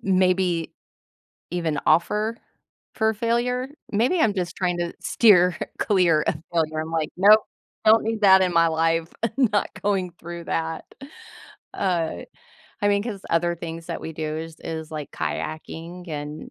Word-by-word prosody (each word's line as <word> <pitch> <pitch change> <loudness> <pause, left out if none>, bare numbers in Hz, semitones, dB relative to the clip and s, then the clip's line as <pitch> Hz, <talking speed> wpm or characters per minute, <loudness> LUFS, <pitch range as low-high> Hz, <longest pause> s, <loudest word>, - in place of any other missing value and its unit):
maybe 185 -3 +1 0.8
even 165 -4 -1
offer 210 +8 +2 0.6
for 220 -1 +2
failure. 240 +3 0 0.2
Maybe 245 - +2
I'm 220 -9 +3
just 180 -3 -3
trying 180 -2 -1
to 170 0 -2
steer 180 -6 +4 0.2
clear 175 -6 +3
of - - 0 0.2
failure. 155 -2 0
I'm 160 - -6
like, 160 -2 -1
"Nope, 210 +4 +7 0.4
don't 220 +1 +7
need 225 -1 -2
that 190 -2 +7
in 185 -1 +2
my 165 0 +5
life. 165 0 0
I'm 230 - +1 0.2
not 205 - +1
going 195 -3 0
through 170 0 -8
that." 165 -1 -2 0.9
Uh, 175 -4 -1 0.6
I 205 - +4
mean, 200 0 +2
'cause 210 -3 -5
other 170 +1 +2
things 165 0 -7
that - - -4
we 160 - -6
do 155 0 -3
is 160 0 -7
is, 160 -1 -6
like, 150 -3 -6
kayaking 165 +3 -5
and 150 0 -6
175 Hz, 155 wpm, -24 LUFS, 165-205 Hz, 0.9 s, Nope